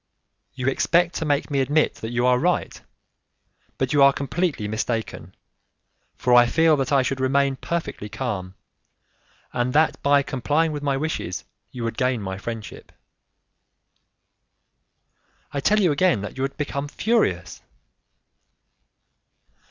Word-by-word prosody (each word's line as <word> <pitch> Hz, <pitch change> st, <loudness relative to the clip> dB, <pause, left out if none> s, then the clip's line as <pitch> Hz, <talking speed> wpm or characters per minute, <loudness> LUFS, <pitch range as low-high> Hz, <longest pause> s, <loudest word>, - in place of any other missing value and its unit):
"You 130 Hz, 0 st, -3 dB
expect 170 Hz, +5 st, +2 dB
to 160 Hz, -, -2 dB
make 145 Hz, 0 st, 0 dB
me 140 Hz, -, +1 dB
admit 145 Hz, +4 st, +2 dB
that 110 Hz, -, -4 dB
you 120 Hz, +1 st, 0 dB
are 125 Hz, 0 st, +4 dB
right, -, -, -1 dB, 1.0 s
but 130 Hz, 0 st, -1 dB
you 145 Hz, -, +4 dB
are 140 Hz, 0 st, +8 dB
completely 140 Hz, -, -2 dB
mistaken, 110 Hz, +1 st, -4 dB, 0.8 s
for 125 Hz, -, +1 dB
I 120 Hz, 0 st, +7 dB
feel 160 Hz, +4 st, +4 dB
that 135 Hz, 0 st, -2 dB
I 135 Hz, -2 st, +4 dB
should 135 Hz, +1 st, -2 dB
remain 135 Hz, +1 st, +2 dB
perfectly 160 Hz, -9 st, -4 dB
calm, 105 Hz, -5 st, -4 dB, 1.0 s
and 120 Hz, +1 st, -1 dB
that 155 Hz, +2 st, +2 dB
by 140 Hz, 0 st, +4 dB
complying 145 Hz, +5 st, 0 dB
with 145 Hz, -1 st, -4 dB
my 140 Hz, -2 st, 0 dB
wishes 135 Hz, -, -3 dB, 0.3 s
you 125 Hz, -, -7 dB
would 115 Hz, -1 st, -3 dB
gain 125 Hz, -2 st, +1 dB
my 95 Hz, -1 st, -5 dB
friendship." 115 Hz, -1 st, -7 dB, 2.6 s
"I 145 Hz, -, -2 dB
tell 210 Hz, +9 st, +3 dB
you 180 Hz, -6 st, +3 dB
again 145 Hz, -, +2 dB
that 105 Hz, -, -7 dB
you 130 Hz, -, -5 dB
would 135 Hz, 0 st, -3 dB
become 145 Hz, -1 st, -3 dB
furious." 145 Hz, -, 0 dB
135 Hz, 135 wpm, -23 LUFS, 120-150 Hz, 2.6 s, are